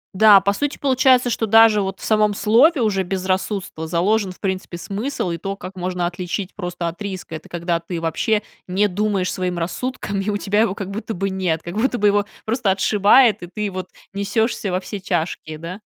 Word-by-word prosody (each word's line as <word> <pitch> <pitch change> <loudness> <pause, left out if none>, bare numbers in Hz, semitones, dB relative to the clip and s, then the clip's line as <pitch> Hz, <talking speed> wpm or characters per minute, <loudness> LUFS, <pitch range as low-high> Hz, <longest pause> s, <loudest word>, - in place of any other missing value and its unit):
Да, 210 0 +8
по 200 +1 +1
сути 290 +7 -2
получается, 255 -2 +3
что 225 0 -1
даже 225 -1 +6
вот 195 0 -4
в - - -8
самом 215 -1 +2
слове 255 +9 +4
уже 205 -4 +1
"безрассудство" 185 -2 -2
заложен, 190 +4 +1
в 185 - -14
принципе, 190 -2 -3
смысл 200 +3 -3
и 170 - -4
то, 195 +3 -4
как 185 -1 -9
можно 180 -1 -2
отличить 180 +2 -4
просто 175 -3 -4
от 170 +4 -6
риска. 190 -4 -6
Это 155 - -10
когда 170 0 -1
ты 170 0 -5
вообще 205 +6 0 0.2
не 195 +3 +2
думаешь 200 -1 -1
своим 180 -1 -2
рассудком, 200 +4 -3
и 195 - -2
у 205 - 0
тебя 205 +1 +1
его 210 -4 +1
как 195 -1 -5
будто 220 +2 -5
бы 195 +2 -2
нет, 180 -4 -1
как 175 +2 -7
будто 245 +2 +1
бы 210 - +3
его 205 0 +3 0.2
просто 225 -1 0
отшибает 210 +4 +4
и 175 - -7
ты 210 +2 -4
вот 185 0 -5 0.3
несешься 200 +1 -1
во 180 - 0
все 200 +2 -7
тяжкие, 170 -4 -3
да? 170 +5 -7
195 Hz, 205 wpm, -21 LUFS, 180-215 Hz, 0.3 s, Да